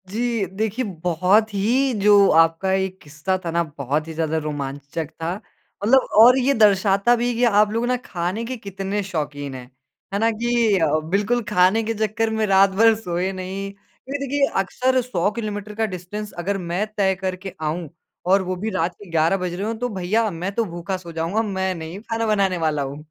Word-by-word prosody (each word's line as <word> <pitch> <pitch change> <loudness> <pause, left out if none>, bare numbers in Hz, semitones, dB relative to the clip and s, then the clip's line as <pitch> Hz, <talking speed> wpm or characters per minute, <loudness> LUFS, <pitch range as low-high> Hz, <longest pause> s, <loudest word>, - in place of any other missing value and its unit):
जी, 230 0 -1
देखिए 215 +6 -2 0.2
बहुत 185 +5 +2
ही 245 +7 +1
जो 205 -1 +6
आपका 165 +4 +1
ये 190 0 +1
किस्सा 155 +5 -2
था 165 - -2
न, 170 +1 +1
बहुत 145 +3 -1
ही 165 - -6
ज़्यादा 160 0 -1
रोमांचक 145 0 -4
था। 165 +2 -1 0.5
मतलब 260 +5 +4 0.2
और 250 +2 +7
ये 265 +2 +2
दर्शाता 205 0 +4
भी 240 +1 0
कि 240 - 0
आप 210 -3 +4
लोग 230 +2 0
ना 250 0 +1
खाने 180 +5 -3
के 255 +2 -5
कितने 200 -1 -4
शौकीन 145 -6 -4
हैं, 125 -1 -8 0.5
है 200 - 0
ना? 225 +1 +3
कि 230 -2 +1
अ, 155 -1 +2
बिल्कुल 210 +6 +1
खाने 205 +3 +3
के 225 +1 -1
चक्कर 225 +2 -1
में 215 - +2
रात 195 0 +5
भर 220 +4 +4
सोए 180 -3 -2
नहीं। 190 +1 -5
क्योंकि 255 +7 -9
देखिए 280 +1 +2
अक्सर 255 +7 +1
100 205 -7 0
किलोमीटर 210 -2 -5
का 220 +1 +1
डिस्टेंस 205 +2 -6
अगर 200 +2 -1
मैं 180 +2 -2
तय 190 -2 +2
करके 185 0 -5
आऊँ 155 +1 -3 0.4
और 195 +1 +5
वो 185 0 -3
भी 205 +5 -3
रात 180 -3 -1
के 200 0 -14
11 165 +3 +2
बज 180 -2 -3
रहे 195 +4 -3
हों 225 - -2
तो 245 +1 -1
भैया 210 +3 0
मैं 175 +4 -4
तो 230 - +1
भूखा 175 +1 -4
सो 175 -2 -10
जाऊँगा, 165 +6 -1
मैं 190 -3 -1
नहीं 165 +3 -7
खाना 225 0 -1
बनाने 195 -4 +2
वाला 155 -3 0
हूँ। 135 +1 -6
195 Hz, 195 wpm, -22 LUFS, 175-220 Hz, 0.5 s, और